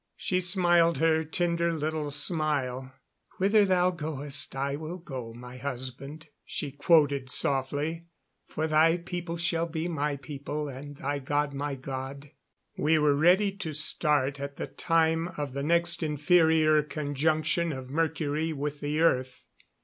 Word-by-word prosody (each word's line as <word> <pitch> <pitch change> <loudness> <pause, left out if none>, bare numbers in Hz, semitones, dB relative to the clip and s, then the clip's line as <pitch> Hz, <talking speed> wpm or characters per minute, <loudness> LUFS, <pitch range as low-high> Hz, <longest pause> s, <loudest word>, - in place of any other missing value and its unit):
She 185 0 0
smiled 175 -3 +3
her 160 +1 +2
tender 170 +1 0
little 155 -1 -2
smile. 145 -4 -1 0.5
"'Whither 205 +2 +4
thou 185 -1 +3
goest, 150 -5 0
I 140 +1 -1
will 160 +4 -6
go,' 130 -9 -7
my 125 +2 -10
husband," 135 +3 -6 0.2
she 145 - -4
quoted 145 -2 +2
softly, 145 +6 -1 0.4
"'for 155 - -2
thy 160 +2 +4
people 175 -1 -5
shall 165 0 0
be 160 0 -3
my 150 -3 -1
people, 145 +2 -5
and 140 +1 -8
thy 145 +1 -2
God 145 +1 -1
my 140 0 -3
God.'" 135 +2 -7 0.4
We 160 +2 +2
were 150 -1 +3
ready 180 +7 +4
to 160 -5 -4
start 150 -2 +1
at 140 0 -6
the - - -3
time 165 0 +1
of 145 -3 -4
the 140 - -3
next 170 +5 +2
inferior 155 0 +3
conjunction 155 +3 0
of 130 -2 -7
Mercury 160 0 -1
with 145 0 -4
the 150 +2 -1
earth. 130 -5 +1
150 Hz, 140 wpm, -28 LUFS, 140-165 Hz, 0.5 s, Whither